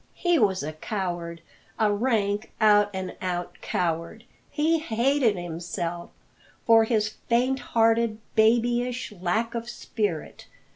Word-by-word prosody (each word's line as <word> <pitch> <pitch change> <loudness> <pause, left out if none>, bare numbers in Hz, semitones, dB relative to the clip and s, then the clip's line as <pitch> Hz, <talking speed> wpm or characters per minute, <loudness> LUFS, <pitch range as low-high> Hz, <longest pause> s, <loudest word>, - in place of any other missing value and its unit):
He 350 -2 +2
was 190 - +2
a 155 +2 -4
coward, 175 -1 -4 0.4
a 215 -2 +2
rank, 210 -2 0
out 205 -2 +5
and 190 -1 -5
out 180 -1 -4
coward. 170 +5 -2 0.3
He 320 +2 +1
hated 250 -3 +1
himself 175 0 -5 0.6
for 225 -1 +6
his 215 -2 +1 0.2
faint 255 +3 +2
hearted, 225 -2 +2 0.2
babyish 240 +2 +2
lack 205 +5 -1
of 235 0 -4
spirit. 205 -9 -4
215 Hz, 115 wpm, -26 LUFS, 180-235 Hz, 0.6 s, for